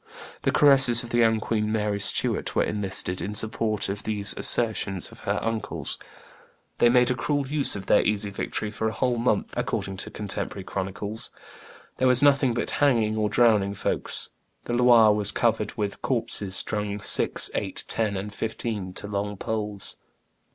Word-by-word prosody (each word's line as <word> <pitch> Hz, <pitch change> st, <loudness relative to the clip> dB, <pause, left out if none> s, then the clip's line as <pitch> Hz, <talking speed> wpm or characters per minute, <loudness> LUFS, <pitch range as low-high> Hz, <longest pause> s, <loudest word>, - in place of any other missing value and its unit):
The -, -, 0 dB
caresses 135 Hz, -5 st, +6 dB
of 120 Hz, -, -9 dB
the 120 Hz, -, +1 dB
young 115 Hz, -1 st, +3 dB
queen 110 Hz, -1 st, -2 dB
Mary 105 Hz, -2 st, -1 dB
Stuart 100 Hz, -, 0 dB
were -, -, +3 dB
enlisted 95 Hz, -3 st, -2 dB
in 105 Hz, +2 st, -5 dB
support 110 Hz, 0 st, -1 dB
of 100 Hz, +1 st, -4 dB
these 100 Hz, -3 st, 0 dB
assertions 105 Hz, -5 st, +1 dB
of -, -, -14 dB
her -, -, +1 dB
uncles. 115 Hz, -1 st, -3 dB, 0.8 s
They 120 Hz, -, +5 dB
made 125 Hz, +1 st, +4 dB
a -, -, +2 dB
cruel 140 Hz, +2 st, -2 dB
use 145 Hz, 0 st, +3 dB
of 100 Hz, -1 st, -7 dB
their 105 Hz, -, +4 dB
easy 105 Hz, -1 st, 0 dB
victory 105 Hz, +2 st, -4 dB
"for 110 Hz, 0 st, -2 dB
a 110 Hz, -, -3 dB
whole 125 Hz, 0 st, -1 dB
month," 120 Hz, -, 0 dB
according 95 Hz, -1 st, -3 dB
to -, -, 0 dB
contemporary 100 Hz, -1 st, -4 dB
chronicles, 100 Hz, +3 st, -4 dB, 0.7 s
"there 130 Hz, -, +2 dB
was 125 Hz, +1 st, +5 dB
nothing 140 Hz, -4 st, +3 dB
but 120 Hz, -, -3 dB
hanging 115 Hz, -7 st, +2 dB
or 105 Hz, -1 st, 0 dB
drowning 105 Hz, -3 st, +2 dB
folks. -, -, -2 dB, 0.4 s
The 120 Hz, -, -4 dB
Loire 120 Hz, -3 st, +5 dB
was 105 Hz, 0 st, +1 dB
covered 110 Hz, -3 st, -1 dB
with 105 Hz, -2 st, -4 dB
corpses 105 Hz, -6 st, -2 dB
strung, 105 Hz, -1 st, 0 dB
six, 100 Hz, -, +2 dB
eight, -, -, -1 dB
ten, 105 Hz, -3 st, -1 dB
and 100 Hz, +2 st, -6 dB
fifteen, 110 Hz, -4 st, -4 dB
to 100 Hz, -, -6 dB
long 100 Hz, 0 st, -4 dB
poles. 105 Hz, -1 st, -3 dB
110 Hz, 170 wpm, -25 LUFS, 100-120 Hz, 0.8 s, caresses